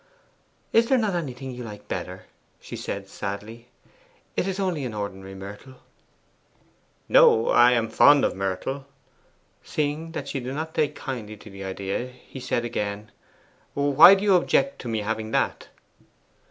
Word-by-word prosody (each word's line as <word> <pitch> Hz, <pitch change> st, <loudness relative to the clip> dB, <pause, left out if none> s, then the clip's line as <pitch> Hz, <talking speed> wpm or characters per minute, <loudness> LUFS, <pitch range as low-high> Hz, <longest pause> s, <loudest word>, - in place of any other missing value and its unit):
'Is 230 Hz, +1 st, +4 dB
there 265 Hz, -, +4 dB
not 215 Hz, -5 st, 0 dB
anything 135 Hz, -6 st, -4 dB
you 125 Hz, 0 st, -7 dB
like 105 Hz, -2 st, -10 dB
better?' 90 Hz, +1 st, -5 dB, 0.3 s
she -, -, -9 dB
said -, -, -5 dB
sadly. 110 Hz, +4 st, -7 dB, 0.7 s
'That -, -, 0 dB
is 195 Hz, 0 st, -3 dB
only 180 Hz, -7 st, -1 dB
an 120 Hz, -4 st, -4 dB
ordinary 95 Hz, -2 st, -6 dB
myrtle.' 105 Hz, +7 st, -10 dB, 1.3 s
'No: 110 Hz, +1 st, +6 dB
I 120 Hz, +1 st, +6 dB
am 115 Hz, -2 st, +1 dB
fond 145 Hz, +5 st, +6 dB
of -, -, -1 dB
myrtle.' 95 Hz, +9 st, -3 dB, 0.7 s
Seeing 155 Hz, +2 st, -3 dB
that -, -, -5 dB
she 140 Hz, -, -3 dB
did 130 Hz, +2 st, -5 dB
not 160 Hz, +1 st, -4 dB
take 155 Hz, -2 st, 0 dB
kindly 110 Hz, -5 st, -6 dB
to 105 Hz, -, -13 dB
the 95 Hz, 0 st, -8 dB
idea, 95 Hz, +5 st, -3 dB
he 125 Hz, +1 st, -12 dB
said 120 Hz, -1 st, -1 dB
again, 105 Hz, -2 st, -4 dB, 0.6 s
'Why 145 Hz, +6 st, +8 dB
do 195 Hz, -, -3 dB
you 205 Hz, -2 st, +4 dB
object 275 Hz, +9 st, +2 dB
to -, -, -7 dB
my 110 Hz, -2 st, -1 dB
having 110 Hz, +1 st, -3 dB
that? -, -, 0 dB
120 Hz, 155 wpm, -25 LUFS, 105-145 Hz, 1.3 s, Why